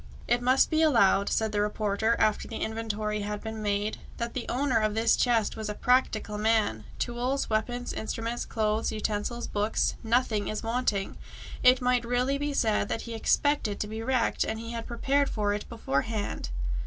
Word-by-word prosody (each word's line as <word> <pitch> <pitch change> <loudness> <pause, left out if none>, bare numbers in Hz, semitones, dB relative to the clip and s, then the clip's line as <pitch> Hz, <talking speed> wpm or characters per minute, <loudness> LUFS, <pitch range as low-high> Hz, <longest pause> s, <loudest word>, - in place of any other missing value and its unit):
"It 240 - +2
must 255 +5 +3
be 315 0 +3
allowed," 230 -10 +4
said 220 -1 0
the 205 -1 +1
reporter, 210 +1 +1
after 215 - +1
the 225 - -7
inventory 215 -1 -2
had 210 0 -3
been 220 -1 -5
made, 205 +1 -1 0.2
"that 235 0 -3
the 255 - -4
owner 255 -2 +1
of 215 -1 0
this 225 +1 +4
chest 230 -4 +2
was 220 -1 -4
a 210 - -3
practical 220 -4 +1
man! 210 - +1
Tools, 245 +2 -1
weapons, 245 +3 -1
instruments, 230 +2 -3
clothes, 215 0 0
utensils, 215 +2 -2
books 210 +1 0
nothing 225 -3 +1
is 215 - -3
wanting! 225 -4 -1 0.4
It 255 +1 +6
might 250 -1 +2
really 250 +4 0
be 290 0 -1
said 215 -4 +1
that 225 - -2
he 235 - -6
expected 225 -1 +1
to 210 - -2
be 220 +1 -5
wrecked, 245 0 +1
and 220 - -3
had 230 0 -5
prepared 275 +4 +1
for 205 -2 0
it 205 - -5
beforehand." 205 - -2
225 Hz, 175 wpm, -28 LUFS, 210-245 Hz, 0.4 s, It